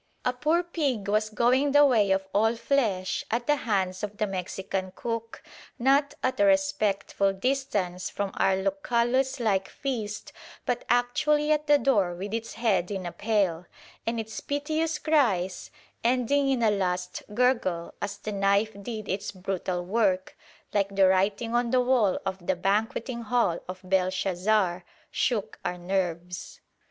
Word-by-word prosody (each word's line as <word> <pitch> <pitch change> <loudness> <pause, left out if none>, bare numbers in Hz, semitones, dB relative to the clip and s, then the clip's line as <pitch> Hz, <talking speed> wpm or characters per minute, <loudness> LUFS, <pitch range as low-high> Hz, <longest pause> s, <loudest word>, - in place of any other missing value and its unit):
A 250 - +2
poor 310 +8 +1
pig 280 - -2
was 215 +1 +1
going 255 +6 +2
the 290 0 +7
way 225 -7 +3
of 190 0 +1
all 225 +3 +3
flesh 225 -6 0
at 240 +2 -1
the 295 - +3
hands 190 -8 -1
of 210 0 -5
the 215 - +1
Mexican 190 0 -4
cook, 230 -1 -5 0.3
not 275 +3 +3
at 255 - 0
a 205 - +5
respectful 195 0 +2
distance 195 -6 -1
from 200 -1 -3
our 190 - +2
Lucullus 235 +7 0
like 195 -5 +1
feast 220 -6 -4 0.3
but 245 - -1
actually 295 +5 +2
at 305 0 +1
the 295 0 +6
door 210 -10 +2
with 195 +4 -6
its 230 0 -3
head 215 -6 +1
in 190 -3 -4
a 175 - -3
pail; 190 -6 0 0.4
and 230 0 0
its 220 0 -5
piteous 310 +2 -1
cries, 215 - +1 0.3
ending 255 +3 +2
in 255 -3 +1
a 220 - +4
last 180 -2 -2
gurgle 230 -9 +1
as 200 0 -3
the 215 - -5
knife 200 +2 +2
did 215 -1 -6
its 195 +2 -3
brutal 185 -2 -3
work, 190 -2 +1 0.4
like 200 -1 0
the 195 -1 +5
writing 200 +5 +1
on 240 0 +2
the 255 +1 +3
wall 245 -6 +3
of 190 -2 -4
the 190 - +2
banqueting 220 +6 -1
hall 225 -7 +1
of 185 0 -6
Belshazzar, 185 0 +1 0.3
shook 225 -5 -1
our 180 - -2
nerves. 180 -1 -3
210 Hz, 155 wpm, -27 LUFS, 190-245 Hz, 0.4 s, the